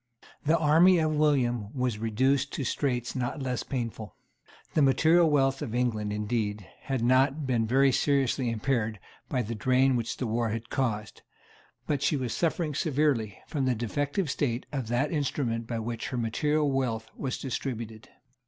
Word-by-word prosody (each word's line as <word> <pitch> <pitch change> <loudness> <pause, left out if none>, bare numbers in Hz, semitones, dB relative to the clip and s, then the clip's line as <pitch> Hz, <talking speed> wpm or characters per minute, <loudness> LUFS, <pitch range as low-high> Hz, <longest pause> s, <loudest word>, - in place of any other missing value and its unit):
The 160 +3 +3
army 165 +4 +5
of 155 -2 +1
William 120 -8 +1
was 125 -4 -1
reduced 130 +5 +1
to - - -2
straits 125 -2 -1
not 125 +3 -2
less 125 -1 -2
painful. 115 -6 -5 0.6
The 155 - +3
material 160 +5 +5
wealth 135 -2 +2
of 120 -6 -4
England, 110 -4 0
indeed, 105 -1 -2 0.2
had 135 -4 -1
not 135 +4 +3
been 120 -4 +1
very 135 +3 +4
seriously 135 -2 +1
impaired 110 -2 -1 0.3
by 125 - 0
the 115 +2 -4
drain 130 +4 +3
which 115 -1 -2
the 130 - -2
war 115 0 0
had 115 +1 -5
caused; 110 -7 -2 0.6
but 145 -3 -1
she 145 +1 +2
was 125 -4 -2
suffering 165 -2 0
severely 135 - 0
from 140 -4 -2
the 130 -1 +2
defective 145 - -1
state 125 -4 -1
of 135 -5 -3
that 120 +5 0
instrument 130 -7 -1
by 120 - -3
which 115 0 -4
her 125 - -4
material 145 +6 +1
wealth 115 -4 -2
was 135 -2 -3
distributed. 115 -4 -5
130 Hz, 160 wpm, -28 LUFS, 115-140 Hz, 0.6 s, army